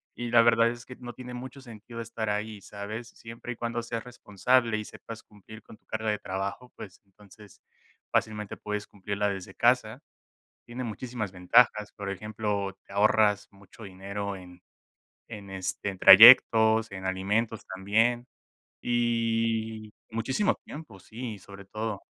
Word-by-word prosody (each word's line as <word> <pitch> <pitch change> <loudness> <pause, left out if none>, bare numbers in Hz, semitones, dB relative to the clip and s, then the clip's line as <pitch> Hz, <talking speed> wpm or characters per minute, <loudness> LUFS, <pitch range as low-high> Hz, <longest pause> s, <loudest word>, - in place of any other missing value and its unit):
y 120 0 -5
la 120 - +7
verdad 115 0 +4
es 120 0 -7
que 125 - -10
no 120 -1 -9
tiene 125 +1 -9
mucho 130 +2 -9
sentido 115 -1 -10
estar 115 -2 -3
ahí, 105 0 -4
¿sabes?, 105 +4 -7
siempre 115 +1 -10
y - - -5
cuando 120 0 -3
seas 115 0 -5
responsable 120 0 0
y 110 - -4
sepas 115 +1 -10
cumplir 110 +1 -15
con 110 - -15
tu - - -45
carga 110 0 -3
de 105 - 0
trabajo, 100 +6 -5
pues, 95 -2 -11
entonces, 100 +1 -18 0.5
fácilmente 105 -2 -1
puedes 105 0 -5
cumplirla 100 +1 -3
desde 95 -2 -6
casa, 120 0 +1 0.7
tiene 120 +2 -6
muchísimas 120 -2 -5
ventajas, 105 +4 +3
por 100 -2 -6
ejemplo, 100 -1 -3
te - - -16
ahorras 105 0 +3
mucho 100 +3 -15
dinero 100 +1 -5
en 90 -1 -13 0.7
en, 105 -4 -9
este, 95 +1 -4
en 95 - -7
trayectos, 110 +1 +8
en 95 -1 -7
alimentos 105 +4 -1
también, 110 +6 0 0.6
y 115 -2 -1 0.2
muchísimo 130 - 0
tiempo, 145 -10 -10
sí, 115 +1 -7
sobre 100 +1 -13
todo 110 0 -5
110 Hz, 150 wpm, -27 LUFS, 100-115 Hz, 0.7 s, trayectos